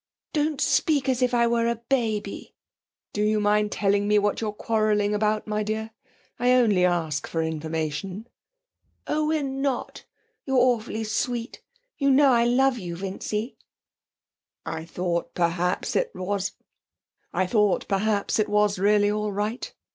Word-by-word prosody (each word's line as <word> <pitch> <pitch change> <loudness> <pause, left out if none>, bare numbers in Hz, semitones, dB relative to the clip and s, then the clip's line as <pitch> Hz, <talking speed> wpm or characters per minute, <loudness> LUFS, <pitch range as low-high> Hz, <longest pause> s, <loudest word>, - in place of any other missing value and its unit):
'Don't 300 -2 0
speak 285 -4 +2
as 260 -1 +1
if 250 -1 +2
I 240 -1 +3
were 235 0 +1
a 235 - +1
baby!' 230 -3 -2 0.6
'Do 210 - -1
you 215 0 +2
mind 210 0 +2
telling 200 0 +1
me 210 0 +4
what 205 +1 +1
we're 215 -2 -1
quarrelling 210 -1 +1
about, 215 0 0
my 215 0 -1
dear? 220 +1 -3 0.5
I 250 +1 +4
only 220 -7 +4
ask 165 -5 0
for 165 -1 -1
information.' 160 +5 -3 0.8
'Oh, 305 0 0
we're 310 -1 +1
not. 270 -1 -3 0.4
You're 270 -1 0
awfully 240 -3 +1
sweet. 235 +2 -3 0.4
You 275 -1 +3
know 275 0 +5
I 235 -1 +4
love 250 +1 +3
you, 175 -3 -5
Vincy.' 195 +5 -4 1.1
'I 160 - -5
thought, 170 0 -3
perhaps, 175 +1 0
it - - +1
was 190 +1 -2 2.3
really 205 +1 +3
all 210 0 -1
right.' 210 +5 -3
215 Hz, 130 wpm, -25 LUFS, 195-245 Hz, 2.3 s, know